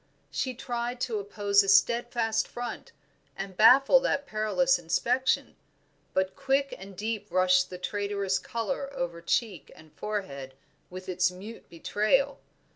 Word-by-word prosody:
She 255 -2 -2
tried 240 0 -4
to 225 -4 -1
oppose 200 0 +2
a 195 - -2
steadfast 235 +2 +2
front 240 0 -7 0.5
and 195 -1 -6
baffle 265 - +7
that 285 - -1
perilous 215 +4 +1
inspection, 240 +10 0 0.6
but 190 0 0
quick 275 +1 0
and 195 0 -12
deep 215 0 -3
rushed 185 0 +3
the 180 - -7
traitorous 200 0 -1
color 270 +4 -3
over 170 -4 -4
cheek 190 +1 -1
and 155 -1 -17
forehead 140 -11 -5 0.3
with 185 +1 -9
its 185 0 +2
mute 200 +5 -11
betrayal. 215 +11 0
210 Hz, 130 wpm, -28 LUFS, 185-240 Hz, 0.6 s, baffle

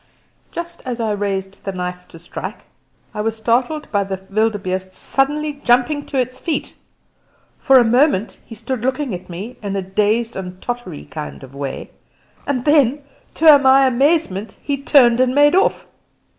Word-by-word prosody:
Just 340 0 -7
as 250 -3 -4
I 225 -2 0
raised 195 -1 -3
the 195 - -3
knife 180 -1 -5
to 165 - -14
strike, 170 +2 -7 0.5
I 210 - -3
was 225 +1 -2
startled 245 +7 0
by 200 -1 +2
the 195 -1 -4
wildebeeste 190 -3 -1
suddenly 290 +4 -1
jumping 250 +5 +2
to 275 - -3
his 255 0 -1
feet. 325 0 -3 0.9
For 270 - +5
a 250 - +7
moment 235 -2 +2
he 225 - -11
stood 235 +2 -4
looking 260 0 -1
at 180 +1 -7
me 200 +8 -7
in 200 -2 -4
a 195 - -2
dazed 215 +5 0
and 185 -1 -7
tottery 240 - -6
kind 70 -1 -8
of 130 - -12
way, 140 -1 -6 0.6
and 255 -4 -1
then 290 -2 +3 0.3
to 310 -3 +7
my 270 0 +5
amazement 260 - +1
he 285 - -1
turned 260 -4 +4
and 255 0 +2
made 290 +1 +5
off. 380 +2 +2
235 Hz, 165 wpm, -19 LUFS, 195-275 Hz, 0.9 s, a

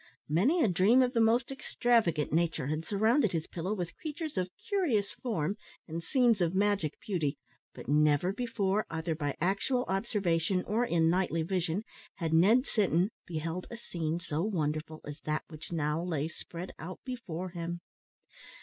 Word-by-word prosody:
Many 235 - +3
a - - +4
dream 200 +8 +5
of 250 0 0
the 230 - +3
most 235 +3 +3
extravagant 230 - +1
nature 160 -4 +1
had 155 +3 -2
surrounded 220 - +2
his 160 -2 -1
pillow 180 +5 -3
with 175 -4 -4
creatures 310 -2 -5
of 185 -1 -1 0.2
curious 310 - +1
form 205 -5 -2 0.3
and 165 0 -4
scenes 235 +1 +3
of 175 +1 +1
magic 200 -6 +1
beauty, 160 -8 -1 0.4
but - - -9
never 150 +5 +3
before, 215 -3 0
either 160 0 -2
by 145 -3 -3
actual 200 +8 +1
observation 190 -3 0
or 220 +4 +1
in 165 -5 +3
nightly 175 -3 +1
vision, 180 +2 -1 0.3
had 165 -3 -2
Ned 215 +11 +5
Sinton 190 -2 +2 0.2
beheld 165 +2 -3
a 235 - -7
scene 170 -7 -3
so 160 -3 -2
wonderful 155 -5 -2
as 145 0 -8
that 155 0 -1
which 160 0 -9
now 155 -1 0
lay 160 -4 -1
spread 170 +2 -8
out 180 +3 -7
before 185 -9 -5
him. 170 0 -4
180 Hz, 160 wpm, -31 LUFS, 160-215 Hz, 0.4 s, dream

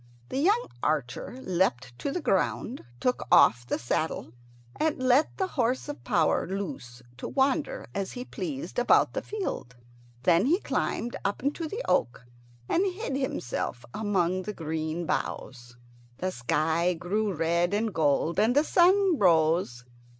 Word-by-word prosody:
The 265 - -2
young 420 - +3 0.2
archer - - -2
leapt 135 -9 0
to 280 - -2
the 345 +2 -3
ground, 215 +6 0 0.2
took 250 - 0
off 120 +1 +6
the - - 0
saddle, 125 0 -2 0.5
and 315 -1 +1
let 255 +3 +2
the 380 - +1
horse 250 0 0
of 290 0 -7
power - - +2
loose 140 -11 -6
to - - -5
wander 270 - 0
as 195 -1 -3
he 245 0 -6
pleased 170 - -4
about 245 - +4
the - - -2
field. 385 - -5 0.5
Then 175 +6 +4
he 345 +6 +3
climbed 240 - -2
up 200 +4 -2
into 295 +4 -1
the 440 +10 -4
oak 120 0 0 0.4
and 360 - +2
hid 365 - -4
himself 130 - -3
among 185 -4 0
the 210 +3 -5
green 160 0 -3
boughs. 120 -5 -4 0.4
The 185 +1 -2
sky 160 +7 +1
grew 200 +5 -1
red 170 +1 +1
and 210 +1 0
gold, 160 +2 +1
and 225 +4 +3
the 290 - +5
sun 365 0 +4
rose. 160 -8 +3
190 Hz, 150 wpm, -28 LUFS, -, 0.5 s, off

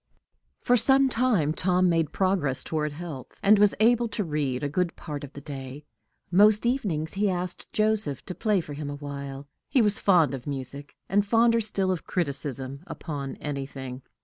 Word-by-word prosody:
For 245 - +4
some 270 +2 +4
time 225 - +2
Tom 180 +2 +2
made 165 -3 +1
progress 185 -9 0
toward 150 -1 -2
health, 150 -5 -8
and 205 +1 +6
was 205 -1 +4
able 235 +2 +4
to 215 -1 -2
read 150 -5 -2
a - - +1
good 175 +4 -1
part 150 -2 -6
of 145 0 -9
the 140 - -9
day. 140 0 -8 0.5
Most 210 +4 +5
evenings 190 - -1
he 200 +1 +1
asked 180 -1 -4
Joseph 215 - 0
to - - -4
play 210 -1 +1
to 150 - -8
him 145 0 -5
for 145 - -4
a - - -5
while; 140 -1 -7 0.2
he 265 - +3
was 210 -1 +1
fond 170 -9 +4
of 130 -1 -6
music, 140 +1 -6
and 200 +2 +3
fonder 230 +2 +3
still 195 -3 0
of 180 - -4
criticism 140 -4 -3
upon 140 -4 -5
anything. 135 -3 -6
165 Hz, 180 wpm, -26 LUFS, 140-205 Hz, 0.5 s, and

